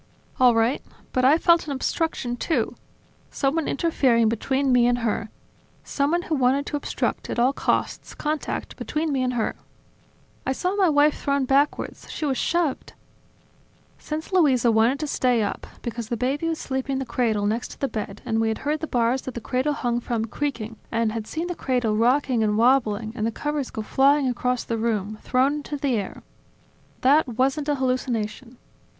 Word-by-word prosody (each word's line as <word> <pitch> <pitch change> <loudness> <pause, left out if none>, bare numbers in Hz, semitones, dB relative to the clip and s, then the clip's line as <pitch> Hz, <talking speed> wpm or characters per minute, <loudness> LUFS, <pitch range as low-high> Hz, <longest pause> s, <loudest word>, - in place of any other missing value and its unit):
"All 250 -2 +6
right... 225 +4 +2 0.3
But 255 0 +2
I 285 +4 +6
felt 340 -1 +3
an 285 - -2
obstruction 265 -2 -1
too, 245 -2 -1 0.6
someone 290 +3 0
interfering 255 -8 +2
between 265 +4 0
me 245 -1 +5
and 245 0 +2
her, 220 0 -1 0.5
someone 305 +5 0
who 325 - -3
wanted 270 0 +2
to - - -4
obstruct, 290 - -2
at - - -3
all 250 +3 +3
costs, - - -1
contact 305 0 -3
between 310 0 -2
me 270 -2 0
and 250 0 0
her... 225 - -1 0.9
I 265 - 0
saw 365 +7 -1
my 385 -4 +4
wife 295 0 +3
thrown 280 -1 +1
backwards, 275 +3 0
she 310 - -4
was 270 -4 0
shoved... 340 -5 -1 1.1
Since 310 +4 -5
Luisa 265 -10 +4
wanted 225 +5 +3
to - - -1
stay 250 -5 +1
up, 205 - -4 0.2
because 235 -1 -4
the 235 - -1
baby 275 +7 -1
was 325 -1 -1
sleeping 265 -1 -3
in 265 - -1
the 265 - -3
cradle 220 -5 0
next 225 +4 -1
to - - -12
the 275 - 0
bed, 210 -4 -6
and 225 0 0
we 225 - +1
had 220 - 0
heard 300 +1 0
the 315 - -4
bars 245 +1 +1
that 260 - -7
the - - -3
cradle 260 +5 0
hung 240 -4 -1
from 235 -2 -2
creaking, 230 -3 -4
and 230 -1 +1
had 220 -1 -5
seen 325 +2 -3
the 355 - -3
cradle 250 -8 0
rocking 245 +2 +2
and 210 -1 +1
wobbling, 225 -3 +2
and 215 - -3
the - - -1
covers 295 +2 -3
go 220 - -5
flying 275 +4 +3
across 250 0 -1
the 230 -1 -3
room, 215 -2 -1
thrown 260 +3 +2
into 295 0 -5
the 275 -2 0
air... 205 -4 -3 0.8
That 285 +4 +4
wasn't 265 +5 0
a 290 - +2
hallucination. 255 -2 -2
255 Hz, 185 wpm, -24 LUFS, 230-290 Hz, 1.1 s, All